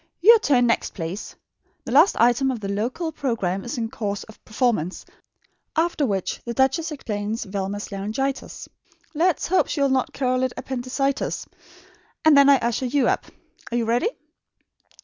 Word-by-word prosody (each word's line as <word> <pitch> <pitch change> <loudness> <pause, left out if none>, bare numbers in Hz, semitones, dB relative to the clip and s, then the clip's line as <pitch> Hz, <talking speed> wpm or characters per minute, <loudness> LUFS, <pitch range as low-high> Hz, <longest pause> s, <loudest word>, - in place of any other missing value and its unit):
Your 450 +6 +7
turn 260 - +3
next, 230 - 0
please. 175 +3 -5 0.5
The - - -5
last 305 +9 +5
item 245 +3 +4
of 255 -3 -2
the 200 - -5
local 240 - -2
programme 210 - -2
is 240 - -5
in 225 -1 -3
course 205 -2 -3
of 220 - -16
performance, 215 -7 -1 0.7
after 320 -3 +1
which 195 -4 -2
the 235 0 -5
duchess 270 +6 +1
explains 220 -5 -3
Velma's 200 +1 -4
laryngitis 220 +8 -3 0.5
let 335 +2 +3
us - - -4
hope 375 +2 +2
she - - -3
will 280 -1 +3
not 260 -1 +1
call 255 -1 0
it 260 -1 0
'appendicitis' 265 +2 -2 0.8
and 315 -2 +7
then 280 0 +7
I 280 - +7
usher 240 +1 -1
you 270 0 +2
up. - - 0 0.4
Are 240 - 0
you 235 - 0
ready?" 240 - +1
245 Hz, 165 wpm, -23 LUFS, 215-280 Hz, 0.8 s, Your